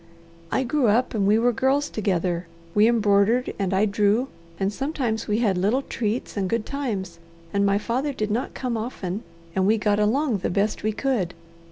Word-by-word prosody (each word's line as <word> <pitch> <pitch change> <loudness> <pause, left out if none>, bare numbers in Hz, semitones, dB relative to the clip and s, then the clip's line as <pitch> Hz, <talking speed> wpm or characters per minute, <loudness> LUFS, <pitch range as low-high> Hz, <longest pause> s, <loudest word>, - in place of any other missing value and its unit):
"I 265 - +1
grew 260 0 +1
up 230 +5 +2
and 200 -3 +1
we 210 +2 +5
were 240 +2 +3
girls 270 +5 +1
together. 180 -4 -1 0.3
We 210 +1 +5
embroidered, 220 +1 +3
and 195 -2 0
I 195 +2 +3
drew, 210 +5 +2 0.3
and 195 +1 0
sometimes 260 -4 -2
we 210 -1 +1
had 205 -6 +1
little 220 +9 +1
treats 225 -1 -3
and 195 -3 -1
good 230 0 0
times, 220 -12 -4 0.3
and 200 0 +2
my 200 0 +3
father 255 +7 -1
did 215 -5 -3
not 235 +5 -2
come 245 -3 -2
often, 215 -4 -4 0.3
and 190 0 +2
we 220 +2 +4
got 210 -1 +1
along 230 +2 +2
the - - -1
best 205 +3 0
we 215 - 0
could. 215 -7 -1
215 Hz, 190 wpm, -24 LUFS, 200-245 Hz, 0.3 s, we